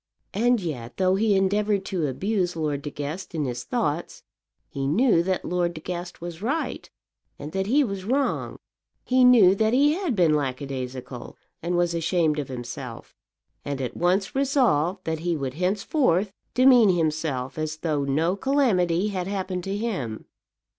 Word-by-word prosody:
And 240 +3 +2
yet, 130 - -6
though 185 -1 +3
he 205 +1 +2
endeavoured 200 +1 +1
to 170 -6 -1
abuse 180 - -1
Lord 150 -3 -2
De 145 - -5
Guest 150 +6 -6
in 150 -2 -1
his 125 -1 -4
thoughts, - - -2 0.4
he 135 -1 -3
knew 195 - +3
that 185 +1 -1
Lord 175 -1 -1
De - - -6
Guest 175 +1 -6
was 170 0 -7
right, 280 +9 -2 0.5
and 150 - -7
that 190 +2 -2
he 285 +6 +4
was 195 -6 -4
wrong. 265 +7 -1 0.5
He 255 0 +3
knew 230 -7 +7
that 220 +3 +1
he 285 +3 +5
had 345 - -1
been 170 -5 +4
lackadaisical, 130 -3 -4 0.2
and 175 +1 -1
was 175 -1 +1
ashamed 165 -2 +1
of 145 - -3
himself; 120 -2 -7 0.5
and 140 -1 -4
at 130 -3 -4
once 185 +3 +1
resolved 230 - +1
that 160 -1 -2
he 170 0 -1
would 135 -3 -3
henceforth 195 - +1 0.2
demean 250 -4 +6
himself 155 -6 -1
as 155 0 -3
though 155 -3 -1
no 155 +7 +1
calamity 200 -8 +2
had 185 -3 -3
happened 190 -2 -3
to 195 +1 -2
him. 180 - -3
180 Hz, 160 wpm, -25 LUFS, 150-205 Hz, 0.5 s, knew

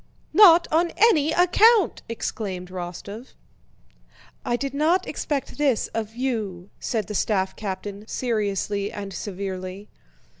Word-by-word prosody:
"Not 345 -5 +7
on 335 +2 +3
any 320 -10 +4
account!" 405 +5 +4
exclaimed 190 -5 -4
Rostóv. 185 +6 -7 1.1
"I 240 - 0
did 275 +2 -3
not 330 +6 +2
expect 290 -1 -3
this 275 -6 +1
of 220 0 -4
you," 215 -8 -3
said 220 -4 -2
the 210 - -6
staff 190 -2 0
captain 205 +1 -6
seriously 205 -4 -1
and 200 -1 -7
severely. 190 +1 -6
220 Hz, 115 wpm, -24 LUFS, 195-290 Hz, 1.1 s, Not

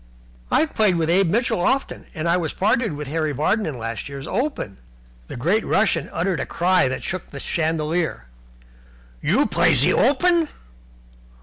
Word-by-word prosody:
"I've 315 - +1
played 210 -4 +3
with 165 -1 0
Abe 185 0 +3
Mitchell 230 -2 +1
often, 270 +9 -1
and 160 +1 -2
I 170 - +3
was 170 -4 -2
partnered 210 +1 +1
with 150 -1 -6
Harry 155 0 -1
Vardon 185 - 0
in 145 -5 -4
last 115 +3 -5
year's 140 0 -7
Open." 230 - -3 0.5
The - - -7
great 185 - +1
Russian 185 -7 +1
uttered 180 0 -1
a - - -2
cry 180 -2 +2
that 130 - -4
shook 185 -2 -4
the 140 - -8
chandelier. 160 - -1 1.0
"You - - +2
play - - +2
in - - +4
ze - - +4
Open? 325 +5 +3
170 Hz, 170 wpm, -22 LUFS, 150-215 Hz, 1.0 s, in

